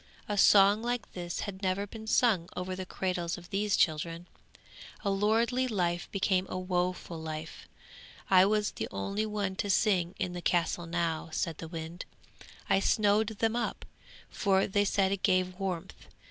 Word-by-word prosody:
A 210 - -1
song 200 +1 +6
like 240 -1 -3
this 175 -2 -4
had 195 -2 -6
never 190 +1 0
been 220 +2 -10
sung 215 -8 +3
over 185 +1 -3
the 185 0 -6
cradles 180 -3 -2
of 175 +1 -13
these 205 0 +1
children. 165 +2 0 0.8
A 200 - 0
lordly 230 +6 +2
life 175 -6 -1
became 190 -1 +1
a - - -3
woeful 180 -2 -2
life! 155 0 -7 0.6
I 185 -1 +6
was 210 0 +1
the 110 - -4
only 200 - -2
one 205 -3 -2
to 205 - -2
sing 185 -3 +2
in 180 - -2
the 175 - -5
castle 175 0 0
now,' 165 -1 -1
said 160 0 -2
the 165 - -6
wind. 165 +1 -7 0.6
'I - - +4
snowed 210 +1 +3
them 225 +1 -1
up, 240 - -2 0.5
for 195 -1 +2
they 205 +1 +1
said 195 -1 +2
it 200 -1 -2
gave 185 -1 +1
warmth. 190 -2 -5
190 Hz, 165 wpm, -30 LUFS, 175-205 Hz, 0.8 s, song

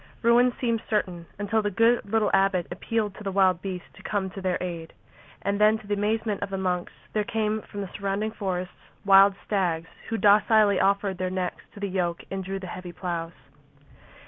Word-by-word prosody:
Ruin 240 +2 +5
seemed 230 -3 0
certain 180 -6 -1
until 205 +2 0
the 205 - 0
good 230 +4 +3
little 220 -2 +2
abbot 195 -3 +3
appealed 210 +3 -2
to 210 - -11
the 195 - -2
wild 185 -2 +3
beasts 185 -2 -5
to - - -15
come 195 -3 -2
to 195 - -7
their 185 -1 0
aid. 170 -3 -5 0.5
And 200 +1 0
then, 215 +1 +5
to 215 - -15
the 205 - -2
amazement 210 0 -1
of 200 - -3
the 195 - -3
monks, 180 -2 -1 0.2
there 215 - +1
came 220 -1 -1
from 205 - -7
the 195 - -5
surrounding 200 +2 -1
forests 185 -4 -3 0.3
wild 195 0 +7
stags, 170 -5 0 0.2
who 225 - -1
docilely 210 -1 +5
offered 195 -1 +1
their 185 0 -1
necks 185 -1 -3
to - - -9
the 200 - -2
yoke 180 -3 -2
and 195 0 -3
drew 195 +1 -4
the 190 - -7
heavy 180 0 -7
ploughs. 170 -2 -4
195 Hz, 200 wpm, -26 LUFS, 185-210 Hz, 0.5 s, wild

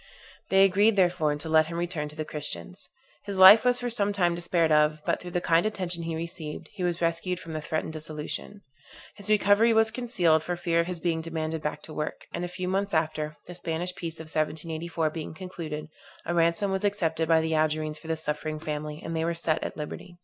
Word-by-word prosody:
They 195 0 +6
agreed, 200 +3 +4
therefore, 175 -5 +2
to 145 +2 -7
let 160 0 +4
him 170 0 -5
return 170 -3 -2
to 150 - -12
the 155 0 -4
Christians. 155 +5 -5 0.3
His 200 -1 -4
life 190 +4 +10
was 250 0 +3
for 245 - -1
some 205 -3 +1
time 175 -3 +2
despaired 170 -1 +1
of; 150 0 +4
but - - 0
through 180 - -7
the 175 0 -1
kind 165 0 +3
attention 185 -5 -2
he 165 -1 -3
received, 165 -2 -6
he 205 - -8
was 175 -1 -1
rescued 170 +2 0
from 165 -3 -8
the 155 - -3
threatened 155 +1 -3
dissolution. 155 +6 -5 0.5
His 205 0 -5
recovery 210 +2 +5
was 220 0 +4
concealed, 190 -10 +2
for 175 +3 -3
fear 170 -1 0
of 170 - +1
his 180 -2 -4
being 165 -1 0
demanded 160 -1 -3
back 150 - -4
to 155 - -8
work; 150 - -4
and 175 - -3
a - - -1
few 180 +1 -5
months 195 0 0
after, 155 -1 -1
the 175 - -9
Spanish 175 +1 -3
peace 165 -2 -6
of 160 - -7
1784 160 +1 -2
being 160 0 -6
concluded, 160 -4 -6 0.4
a 175 - -1
ransom 170 +4 +2
was 190 +1 -1
accepted 165 -6 0
by 165 -1 +6
the 160 0 -1
Algerines 155 0 0
for - - -13
this 160 -1 -2
suffering 155 +1 -2
family, 150 0 -5
and 165 - -4
they 160 - 0
were 170 +1 -1
set 165 -1 0
at - - -5
liberty. 175 +4 -7
165 Hz, 220 wpm, -27 LUFS, 155-185 Hz, 0.5 s, life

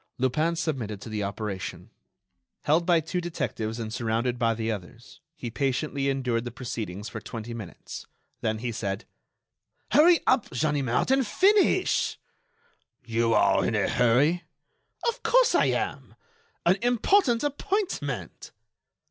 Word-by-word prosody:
Lupin 155 +7 +1
submitted 130 - -3
to 115 - -8
the 110 -1 -3
operation. 100 -2 -5 0.7
Held 160 +3 +2
by 170 -2 +4
two 175 +3 -3
detectives 120 -9 -3
and 110 -1 -4
surrounded 120 +1 -1
by 115 -1 +2
the 110 0 -2
others, 95 -5 -9
he 120 - -6
patiently 140 +2 -1
endured 125 -4 0
the 120 - -4
proceedings 110 -5 -5
for 110 - -7
twenty 115 +2 -6
minutes, 105 -9 -8 0.3
then 110 -3 -1
he 120 +2 -3
said: 100 -1 -3 0.9
"Hurry 335 +3 +6
up, 255 -4 +2
Ganimard, 140 - 0
and 265 -3 +3
finish!" 395 - +3 0.9
"You 115 0 +1
are - - +4
in - - 0
a - - +2
hurry." 135 +9 +3 0.7
"Of 470 - -1
course - - +4
I - - +4
am. - - -2 0.5
An 180 +3 +4
important 245 - +3
appointment." 375 +7 -3
125 Hz, 130 wpm, -27 LUFS, 115-175 Hz, 0.9 s, Hurry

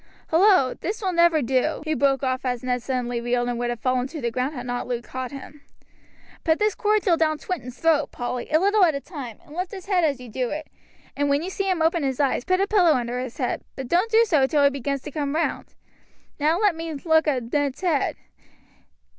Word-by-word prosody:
"Hullo! 340 -6 +5
this 415 +5 -4
will 385 -3 -1
never 340 -3 +4
do," 265 +6 0
he 310 - 0
broke 275 -1 +1
off 255 0 -1
as 250 -2 -2
Ned 250 -1 -1
suddenly 245 -1 -2
reeled 240 0 0
and 240 -1 -2
would 240 0 -1
have 240 -1 -3
fallen 255 0 +1
to 310 +3 -7
the 235 -3 -2
ground 255 +5 -2
had 245 -1 -6
not 245 0 -3
Luke 240 -1 -3
caught 255 0 -5
him. 280 +2 -10 0.8
"Pour 320 - +3
this 425 +3 +1
cordial 415 -5 +2
down 310 -1 +1
Swinton's 255 -8 -5
throat, 320 -2 +2
Polly, 245 0 -4
a 310 - +4
little 400 +2 +3
at 325 -5 +4
a - - -2
time, 275 - -8
and 295 - -13
lift 365 +1 -2
his 380 -3 -8
head 375 -3 +2
as 285 -5 +1
you 250 - -10
do 245 +2 -2
it, 305 +1 -5 0.5
and 285 0 0
when 285 +2 +2
you 370 - -4
see 390 0 -2
him 350 -4 +1
open 330 +1 +2
his 270 -2 -2
eyes, 275 -3 +1
put 370 0 +2
a 390 - +3
pillow 375 -6 +4
under 245 -2 -2
his 250 -2 -6
head; 250 -4 -1
but 265 - -6
don't 360 - +2
do 455 +1 +5
so 300 -10 +3
till 290 0 +2
he 280 - +5
begins 275 0 -3
to 295 - -7
come 290 -1 -2
round. 330 - -2 0.6
Now 310 +3 +2
let 410 -3 +3
me 325 0 -5
look 320 +2 +2
at 250 -5 -1
Ned's 285 -1 0
head. 335 -7 +1
290 Hz, 235 wpm, -24 LUFS, 255-335 Hz, 0.8 s, Hullo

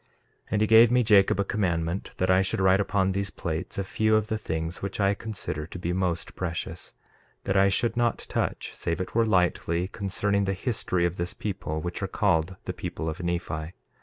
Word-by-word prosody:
1:2 - - -39 0.4
And 105 - 0
he 110 - +3
gave 115 +1 +8
me, 125 +1 +3
Jacob, 100 -3 +5
a - - +3
commandment 90 -3 -1
that 95 0 +2
I 95 +1 +5
should 95 - 0
write 95 0 +4
upon 95 -1 +1
these 100 +1 -1
plates 85 -2 -4
a 100 - 0
few 110 +3 +1
of 110 0 +1
the 110 - 0
things 80 -2 -3
which 100 +1 -4
I 100 0 +3
consider 100 -8 -4
to 90 - -8
be 90 0 -2
most 90 -2 -1
precious; 85 -2 -4 0.5
that 95 - -1
I 95 0 +5
should 115 +4 +1
not 120 -1 0
touch, - - -2
save 85 -1 -2
it 95 - -4
were 115 0 +3
lightly, 90 -2 +1
concerning 100 +1 -1
the 95 - 0
history 95 -4 0
of 85 +1 -2
this 85 +1 -2
people 95 -7 -4
which 85 +3 -4
are 95 - -1
called 95 -3 +1
the - - -4
people 80 - -5
of 80 +2 -5
Nephi. 85 -2 -3
95 Hz, 210 wpm, -27 LUFS, 85-100 Hz, 0.5 s, gave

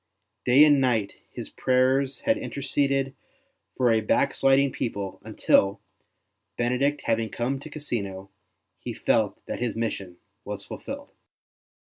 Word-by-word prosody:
Day 135 +5 +7
and 145 -2 +5
night 115 -6 +1 0.2
his - - -8
prayers 130 +1 +2
had 280 0 +2
interceded 140 - -1 0.6
for 125 -2 +3
a 110 -1 +3
backsliding 135 +4 +3
people 100 -6 -4
until, 100 0 +2 0.8
Benedict 135 +4 +1
having 115 -1 +1
come 130 +3 -2
to 155 - -10
Cassino, 100 -10 -5 0.5
he - - -5
felt - - 0
that - - -5
his 120 -2 -2
mission 100 -6 -3 0.3
was - - -6
fulfilled. - - -8
130 Hz, 120 wpm, -26 LUFS, 110-140 Hz, 0.8 s, Day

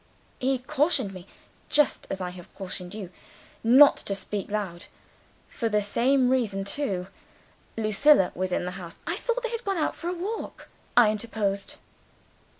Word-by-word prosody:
He 265 +1 +1
cautioned 260 - +1
me 185 0 -10 0.4
(just 295 -1 +2
as 195 - -3
I 180 -1 -3
have 180 -1 -12
cautioned 185 -1 -6
you) 195 -5 -7 0.5
not 260 +5 +7
to 195 - -3
speak 200 0 -5
loud. 200 -5 -3 0.6
For 230 - -2
the 210 -1 +2
same 250 +5 +2
reason 215 -7 0
too. 200 -4 -2 0.7
Lucilla 220 +1 +4
was 185 +1 -2
in 180 - 0
the 180 - -3
house 170 -1 -9
" - - -30
"I 335 - -1
thought 485 +4 -2
they 475 - -2
had 465 0 -4
gone 395 -4 -1
out 310 - 0
for 340 - -7
a - - -1
walk," 405 +6 -5 0.3
I 230 -3 +7
interposed. 205 -3 -2
215 Hz, 165 wpm, -26 LUFS, 195-280 Hz, 0.7 s, not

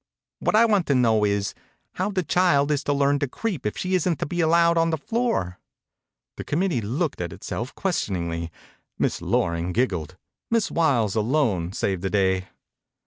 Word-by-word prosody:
What - - +1
I 225 +2 +6
want 205 -6 +2
to 140 - +2
know 115 -4 +3
is, 100 -1 0 0.4
how 185 +3 -1
the 190 -3 -1
child 150 -3 +2
is 145 -1 0
to - - +1
learn 140 0 +2
to 145 - 0
creep 170 - -3
if 105 - -4
she 185 0 -2
isn't 180 -3 +1
to - - -2
be 175 +4 -2
allowed 170 +1 +4
on 165 0 +3
the 160 - 0
floor." 225 - -1 0.8
The - - -5
committee 165 -4 0
looked 135 - -2
at 85 - -3
it - - -12
self 120 +4 -5
questioningly. 85 - -2 0.5
Miss - - -1
Loring 85 +1 0
giggled. 90 - -1 0.3
Miss 230 -2 +1
Wiles 125 - +2
alone 110 - +1
saved 95 -2 -2
the, 95 - -1
day. 95 -2 +1
140 Hz, 180 wpm, -24 LUFS, -, 0.8 s, I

